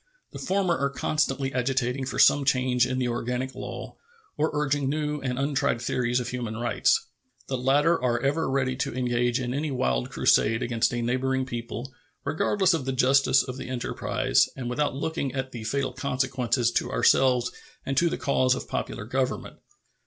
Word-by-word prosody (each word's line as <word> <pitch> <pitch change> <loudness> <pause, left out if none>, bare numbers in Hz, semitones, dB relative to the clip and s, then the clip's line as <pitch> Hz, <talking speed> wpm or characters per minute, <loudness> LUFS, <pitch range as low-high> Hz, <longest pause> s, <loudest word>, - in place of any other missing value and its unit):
The - - -8
former 185 -3 +1
are 140 - +1
constantly 135 -2 -1
agitating 130 0 -1
for - - -4
some 145 - +5
change 130 -2 +2
in 130 - -2
the 125 -1 0
organic 125 +2 -2
law, - - -7 0.4
or 155 +1 +1
urging 145 -2 0
new 150 0 -2
and 125 -2 -2
untried 140 -2 0
theories 120 +1 0
of 120 -1 -4
human 120 -3 -4
rights. 120 0 +1 0.4
The 130 - -1
latter 145 +6 +3
are 120 -1 +1
ever 140 +5 0
ready 130 -1 0
to 130 - -2
engage 120 0 +1
in 125 -1 -3
any 150 +3 -1
wild 65 - 0
crusade 115 +2 +2
against 115 -2 +1
a 120 -1 -2
neighboring 130 +2 0
people, 120 +1 -6 0.3
regardless 180 +6 +2
of 160 -6 -1
the 135 - -1
justice 130 0 +4
of 125 0 -6
the 130 - -7
enterprise 125 -2 +1
and 125 -2 -4
without 145 +1 0
looking 140 -2 -3
at 130 -1 -3
the 120 -3 -7
fatal 130 +2 -1
consequences 125 -2 0
to - - 0
ourselves 125 -2 +3 0.3
and 135 - -2
to 170 +3 +4
the - - -3
cause 130 -2 +2
of - - -6
popular - - -4
government. - - -2
130 Hz, 175 wpm, -26 LUFS, 125-140 Hz, 0.4 s, some